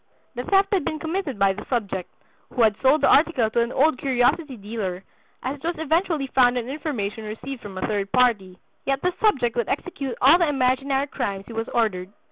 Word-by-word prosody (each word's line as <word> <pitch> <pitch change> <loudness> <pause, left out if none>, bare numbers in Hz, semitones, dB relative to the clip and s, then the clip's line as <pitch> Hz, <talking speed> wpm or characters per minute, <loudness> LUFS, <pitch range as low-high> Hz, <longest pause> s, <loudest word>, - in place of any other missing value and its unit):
The 245 -1 -4
theft 390 0 +3
had 375 -5 +2
been 310 - -2
committed 320 - -3
by 195 -1 +3
the 195 - -8
subject, 200 -7 -2 0.4
who 245 - +2
had 215 -2 +4
sold 270 +4 +4
the - - +4
article 270 -8 +3
to 235 - +2
an 235 +1 -1
old 290 -1 +2
curiosity 265 +2 +1
dealer, 200 -3 -5 0.4
as 265 +3 -3
it 280 - -22
was 340 +1 -2
eventually 320 -1 0
found 250 -2 +3
on 240 -1 -3
information 255 -8 -4
received 230 +5 -7
from 200 -2 -9
a 185 - -2
third 200 -2 -2
party. 215 -8 +2 0.3
Yet 275 -1 0
this 360 0 +1
subject 265 - +2
would 235 -2 -1
execute 275 -4 -3
all 285 +7 +6
the 340 -3 +2
imaginary 270 0 +1
crimes 200 -9 -4
he 230 - -10
was 225 0 -3
ordered." 195 -5 -1
255 Hz, 205 wpm, -23 LUFS, 215-290 Hz, 0.4 s, all